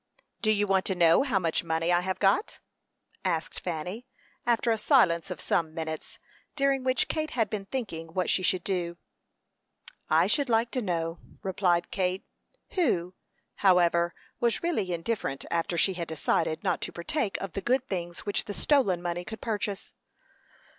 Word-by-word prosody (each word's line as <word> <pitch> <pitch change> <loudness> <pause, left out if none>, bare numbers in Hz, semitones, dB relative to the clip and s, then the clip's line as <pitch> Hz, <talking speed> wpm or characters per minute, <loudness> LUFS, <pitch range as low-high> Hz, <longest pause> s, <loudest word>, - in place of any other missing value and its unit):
"Do 215 - +2
you 205 -1 +3
want 195 -1 +2
to 190 - 0
know 170 -2 +5
how 260 -7 +1
much 170 -4 0
money 165 +1 0
I 175 0 +4
have 190 +1 -2
got?" 200 - +2 0.6
asked 165 -4 -1
Fanny, 180 +8 -5 0.4
after 235 0 +3
a 225 - +2
silence 195 - +4
of 180 - -5
some 160 -2 0
minutes, 160 -1 -4 0.4
during 275 -2 +2
which 255 0 +2
Kate 310 -1 -1
had 225 -8 0
been 205 -2 -3
thinking 195 -10 -4
what 185 -1 +1
she - - +2
should 185 0 +1
do. 175 -3 -2 1.1
"I - - +5
should 285 -3 +1
like 230 +1 +2
to 255 - -1
know," 165 -4 -2 0.2
replied 180 -2 +1
Kate, 185 -1 -1 0.5
who, 185 - +1 0.4
however, 175 -3 +4 0.2
was 235 +5 +1
really 220 - 0
indifferent 170 -5 -2
after 170 +1 0
she 190 - +3
had 170 -2 -4
decided 160 0 0
not - - 0
to - - -3
partake 195 - -2
of 195 -3 -5
the 195 - -3
good 255 +3 +1
things 175 -3 -4
which 205 -1 -1
the 205 - -5
stolen 200 - +2
money 175 0 -2
could 220 +4 -7
purchase. 205 -3 -3
190 Hz, 165 wpm, -28 LUFS, 170-225 Hz, 1.1 s, know